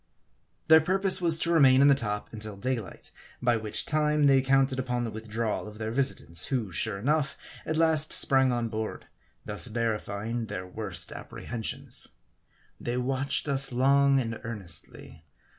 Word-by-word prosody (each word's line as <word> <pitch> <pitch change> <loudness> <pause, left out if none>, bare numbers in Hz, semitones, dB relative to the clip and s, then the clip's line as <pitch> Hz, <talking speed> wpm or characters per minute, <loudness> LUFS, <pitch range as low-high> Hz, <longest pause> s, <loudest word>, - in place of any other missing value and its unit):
Their 160 0 +8
purpose 190 +3 +2
was 165 -2 +4
to 170 +1 -1
remain 135 -6 +6
in 140 - +6
the 140 - +7
top 105 -6 -3
until 105 -2 -7
daylight; 115 -3 -5 0.3
by 120 -1 +2
which 110 -2 -2
time, 150 -1 +1
they 135 -1 +5
counted 135 0 +2
upon 125 -1 -2
the 115 - -3
withdrawal 110 0 -3
of 105 0 -11
their 110 0 -4
visitants; 115 -10 0
who, 115 -8 -2
sure 100 +5 -1
enough, 140 +6 0 0.3
at 160 - -1
last 160 -2 +2
sprang 135 -2 +3
on 120 -1 -1
board, 110 -1 -5 0.4
thus 105 +3 -2
verifying 110 0 -3
their 90 -3 -5
worst 95 0 -2
apprehensions. 115 -2 -3 0.7
They 120 +1 -3
watched 135 +3 0
us 135 -1 +1
long 140 +2 +3
and 115 -3 -3
earnestly. 90 -7 -6
125 Hz, 155 wpm, -28 LUFS, 110-140 Hz, 0.7 s, Their